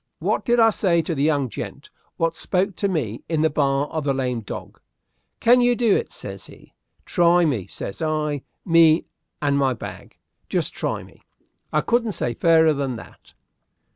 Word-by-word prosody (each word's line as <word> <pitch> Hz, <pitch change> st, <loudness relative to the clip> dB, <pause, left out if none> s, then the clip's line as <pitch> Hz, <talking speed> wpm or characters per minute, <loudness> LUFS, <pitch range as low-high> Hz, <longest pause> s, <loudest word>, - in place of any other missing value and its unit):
"Wot -, -, 0 dB
did 240 Hz, -1 st, +2 dB
I 225 Hz, -1 st, +6 dB
say 170 Hz, -5 st, +2 dB
to 165 Hz, -, -2 dB
the 140 Hz, -, -2 dB
young 145 Hz, -3 st, +2 dB
gent 110 Hz, -, -8 dB, 0.3 s
wot 165 Hz, 0 st, 0 dB
spoke 190 Hz, +1 st, -1 dB
to 200 Hz, -, 0 dB
me 120 Hz, -, -2 dB
in 160 Hz, -2 st, +1 dB
the 160 Hz, -, +2 dB
bar 140 Hz, -1 st, +1 dB
of 155 Hz, -1 st, -3 dB
the 140 Hz, -1 st, 0 dB
Lame 125 Hz, -3 st, -1 dB
Dog? 105 Hz, -, -8 dB, 0.6 s
'Can 245 Hz, +2 st, +5 dB
you 245 Hz, 0 st, +3 dB
do 230 Hz, -4 st, +3 dB
it?' -, -, -2 dB
says -, -, -8 dB
he. -, -, -17 dB, 0.3 s
'Try 175 Hz, 0 st, +4 dB
me,' 115 Hz, -, -1 dB
says 100 Hz, -, -7 dB
I, 155 Hz, -2 st, -1 dB, 0.2 s
'me 165 Hz, -2 st, +5 dB, 0.4 s
and 140 Hz, -1 st, +2 dB
my 135 Hz, -2 st, +2 dB
bag. -, -, -10 dB, 0.3 s
Just -, -, -1 dB
try -, -, -3 dB
me.' -, -, -18 dB, 0.5 s
I 150 Hz, -, +2 dB
couldn't 235 Hz, +1 st, 0 dB
say 120 Hz, -, -2 dB
fairer 160 Hz, +3 st, +4 dB
than 135 Hz, -3 st, -2 dB
that." 115 Hz, -, -13 dB
155 Hz, 180 wpm, -23 LUFS, 140-175 Hz, 0.6 s, I